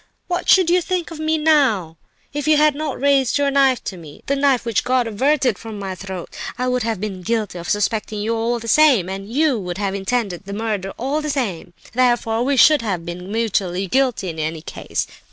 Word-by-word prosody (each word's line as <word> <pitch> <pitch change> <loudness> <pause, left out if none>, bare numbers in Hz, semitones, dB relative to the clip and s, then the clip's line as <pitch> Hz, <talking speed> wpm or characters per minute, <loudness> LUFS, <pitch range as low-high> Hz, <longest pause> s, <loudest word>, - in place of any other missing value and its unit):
What 355 -1 -2
should 370 -3 +5
you 360 +1 +4
think 350 -1 -2
of 320 - -8
me 315 0 +1
now 270 - +2 0.4
if 290 +1 -3
you 310 -1 +5
had 300 0 +4
not 295 -1 -4
raised 275 -2 +3
your 285 -1 +1
knife 270 -2 +3
to 190 - -5
me—the 165 - -5
knife 275 -3 +2
which 230 -4 0
God 250 0 +1
averted 255 0 +1
from 220 -2 -8
my 195 -2 -4
throat? 185 -1 -8 0.2
I 250 - -1
would 250 0 0
have 225 -3 -2
been 195 -2 -5
guilty 215 -2 -2
of 170 - -7
suspecting 210 +1 -1
you 220 +2 -1
all 230 +2 0
the 230 0 -8
same—and 205 - +3
you 285 -2 +2
would 180 -2 -5
have 200 -1 -1
intended 195 -2 -2
the 200 - -6
murder 205 -3 -2
all 275 +5 -1
the 300 - -3
same; 200 - -3 0.2
therefore 240 -2 +2
we 275 +1 +1
should 300 +2 +6
have 190 -7 -3
been 180 +2 -7
mutually 195 -4 -1
guilty 250 -3 0
in 160 -1 -6
any 155 0 -3
case. - - -4
230 Hz, 210 wpm, -20 LUFS, 195-280 Hz, 0.4 s, should